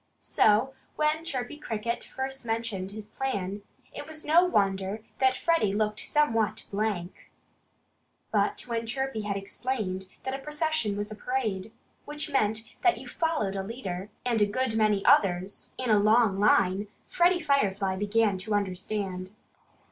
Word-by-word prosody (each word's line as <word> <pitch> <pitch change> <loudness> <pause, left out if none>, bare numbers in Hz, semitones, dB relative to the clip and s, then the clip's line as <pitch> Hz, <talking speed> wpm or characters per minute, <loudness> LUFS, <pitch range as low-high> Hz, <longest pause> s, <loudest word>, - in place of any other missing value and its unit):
So 220 +6 +3 0.2
when 305 +1 +1
Chirpy 275 -3 -3
Cricket 235 -4 -3
first 265 0 -5
mentioned 225 -5 -2
his 210 +1 -8
plan 205 -7 -3 0.3
it - - -7
was 310 -1 -6
no 330 +4 +6
wonder 200 - +1 0.2
that 260 -1 +4
Freddie 275 -13 +2
looked 215 0 0
somewhat 225 -8 +1
blank. 200 -4 -3 1.0
But - - +1
when 230 -1 -3
Chirpy 265 -2 -2
explained 200 -1 -3 0.2
that 265 - -3
a 270 - -3
procession 300 -7 -1
was 205 +1 -3
a - - -5
parade, 220 -4 -2 0.3
which 295 0 -4
meant 220 -5 +2 0.2
that 360 -2 +4
you - - -9
followed 310 - -1
a 195 - -1
leader 195 -3 -5 0.2
and 235 -3 +1
a 205 - +5
good 250 +2 -1
many 210 -2 +2
others 190 0 +3
in 250 -3 -1
a 210 - +6
long 215 -1 +4
line, 200 -1 +3 0.2
Freddie 350 +1 +3
Firefly 205 - +1
began 205 -1 +2
to 205 +3 -1
understand. 195 -1 -3
215 Hz, 145 wpm, -28 LUFS, 200-265 Hz, 1.0 s, no